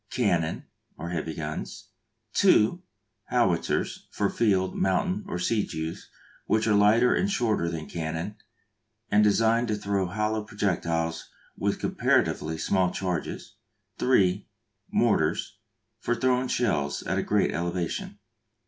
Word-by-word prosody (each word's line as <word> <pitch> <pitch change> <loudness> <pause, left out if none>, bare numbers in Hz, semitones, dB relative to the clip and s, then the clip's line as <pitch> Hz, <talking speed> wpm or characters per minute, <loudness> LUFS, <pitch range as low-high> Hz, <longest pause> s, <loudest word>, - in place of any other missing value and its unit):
Cannon, 85 -10 0 0.3
or 85 +3 -5
heavy 80 -2 -3
guns. 80 -1 -6 0.5
(ii.) 110 +12 +5 0.5
Howitzers, - - 0
for 100 - -1
field, 95 -5 +1
mountain, 185 - 0
or 200 - -3
siege 110 -3 -1
use, 80 +1 -5 0.4
which 110 0 +2
are 110 - +3
lighter 105 +4 +5
and 200 - +1
shorter 110 - +1
than 80 -2 -5
cannon, 80 +4 -4 0.8
and 105 +1 +5
designed 115 +3 +3
to 105 - 0
throw 100 -2 -1
hollow 105 +3 -1
projectiles 85 -5 -2 0.3
with - - -1
comparatively 80 +1 +1
small 95 +2 +1
charges. 90 -3 -4 0.4
(iii.) 100 -6 +3 0.4
Mortars, - - +1 0.4
for 120 - 0
throwing 130 0 +1
shells 80 - 0
at - - -1
a - - -1
great - - +2
elevation. 85 0 -3
100 Hz, 120 wpm, -27 LUFS, 85-110 Hz, 0.8 s, ii